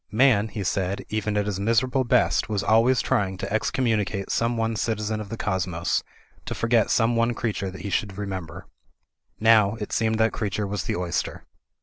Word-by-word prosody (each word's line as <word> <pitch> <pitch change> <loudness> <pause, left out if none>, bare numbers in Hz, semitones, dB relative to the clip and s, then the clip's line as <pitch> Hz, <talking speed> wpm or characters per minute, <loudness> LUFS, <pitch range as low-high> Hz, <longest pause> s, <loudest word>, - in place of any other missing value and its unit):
Man, 110 -2 +4
he 105 -2 -5
said, 95 +1 -1
even 105 -1 -1
at 105 - +1
his 100 -2 -3
miserable 120 +5 +2
best, 125 -2 +2
was 105 -2 -1
always 115 +3 +4
trying 95 -2 0
to 100 +1 -5
excommunicate 110 -4 0
some 115 0 0
one 115 0 0
citizen 110 0 -2
of 105 - -8
the 115 - -5
cosmos, 90 -4 -1 0.5
to - - -3
forget 115 -2 +2
some 115 0 +2
one 115 +1 +1
creature 105 -4 -2
that 95 -1 -9
he 100 +1 -5
should 100 -1 -1
remember. 95 -5 -6 0.7
Now, 110 -2 +5
it 105 -2 -6
seemed 110 0 +1
that 110 0 +2
creature 105 -1 -2
was 100 -1 -3
the - - -1
oyster. 90 -1 -3
105 Hz, 185 wpm, -25 LUFS, 100-115 Hz, 0.7 s, Now